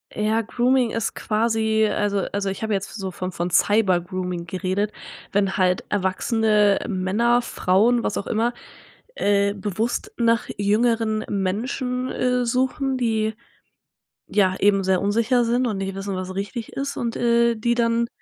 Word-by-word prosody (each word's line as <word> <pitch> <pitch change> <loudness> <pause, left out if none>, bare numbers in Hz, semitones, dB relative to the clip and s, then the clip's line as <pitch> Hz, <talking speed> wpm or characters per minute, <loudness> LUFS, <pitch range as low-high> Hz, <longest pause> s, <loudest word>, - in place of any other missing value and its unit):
Ja, 215 +2 +1
Grooming 245 +2 +1
ist 230 -1 -2
quasi 220 0 +1
also 205 -2 0
also, 200 -1 -1
ich 195 - -5
habe 220 -1 -1
jetzt 195 0 -3
so 190 -3 -4
von 185 0 -5
von 175 +1 -2
Cybergrooming 180 -3 +1
geredet, 190 +4 -2 0.4
wenn 195 -1 +1
halt 185 -1 +2
erwachsene 205 +1 +2
Männer, 215 +5 +1
Frauen, 230 +3 +2
was 210 - -1
auch 200 - -3
immer, 230 +2 0 0.6
äh, 200 - +2
bewusst 210 +3 -3
nach 230 -1 +2
jüngeren 220 +1 +1
Menschen, 250 +6 -2
äh, 250 -1 0
suchen, 260 +2 0
die, 220 -2 0 0.9
ja, 190 -3 +2
eben 195 -1 +3
sehr 185 -1 +2
unsicher 230 +4 +2
sind 245 +2 +1
und 215 -4 -2
nicht 195 0 -4
wissen, 195 0 -4
was 185 0 -5
richtig 205 +3 -5
ist 280 +1 -4
und, 235 -1 -2
äh, 235 0 +3
die 235 +2 0
dann 235 0 +1
215 Hz, 150 wpm, -23 LUFS, 195-235 Hz, 0.9 s, eben